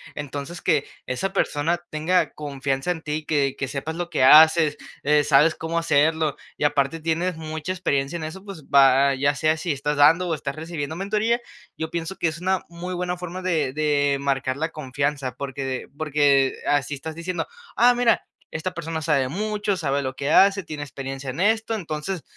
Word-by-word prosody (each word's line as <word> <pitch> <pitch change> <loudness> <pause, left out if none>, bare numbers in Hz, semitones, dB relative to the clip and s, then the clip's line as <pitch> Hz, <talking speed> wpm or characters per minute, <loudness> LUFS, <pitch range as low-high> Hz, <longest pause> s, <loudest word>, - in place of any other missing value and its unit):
Entonces, 145 +3 -6
que 145 -2 +2 0.2
esa 130 +10 -2
persona 165 +4 0
tenga 160 +4 +1
confianza 140 +1 -2
en 165 -2 -4
ti, 155 0 -3
que 140 -3 +1
que 135 - -2
sepas 150 +4 -4
lo 175 0 -4
que 130 - +1
haces, 155 +2 +7 0.3
eh, 150 +1 +4
sabes 150 +3 +4
cómo 165 +1 -3
hacerlo 160 -1 +2 0.2
y - - -3
aparte 145 +2 +1
tienes 165 +2 -1
mucha 160 +1 -5
experiencia 160 -4 -1
en 165 - -6
eso, 180 +5 -8
pues 195 -6 -9
va 135 0 +5
ya 140 +2 +2
sea 155 +3 +2
si 170 +1 -2
estás 145 +1 -1
dando 165 +5 +5
o 165 - 0
estás 140 -2 -5
recibiendo 160 -1 -5
mentoría, 215 +5 0 0.4
yo 160 - -3
pienso 170 +2 -4
que - - +1
es 160 0 -4
una 190 0 +1
muy 170 +2 -6
buena 180 0 -2
forma 180 +1 -6
de 160 -7 0
de 145 -2 +1
marcar 135 -1 -1
la 160 +2 -1
confianza, 140 -3 -3
porque 140 0 -5
de 130 -1 -4
porque 145 -3 +2
así 145 0 +1
estás 160 +3 -7
diciendo: 175 +2 -3 0.3
"Ah 245 +2 +6
mira, 240 -1 +2 0.3
esta 180 +3 -4
persona 165 -2 -4
sabe 140 -5 +1
mucho, 205 +3 -1
sabe 140 -4 0
lo 130 -1 -3
que 140 +1 -3
hace, 195 +4 +5
tiene 150 -3 -6
experiencia 135 -1 -6
en 130 +5 -5
esto". 220 +3 +2
Entonces 170 -2 -4
155 Hz, 190 wpm, -23 LUFS, 140-175 Hz, 0.4 s, haces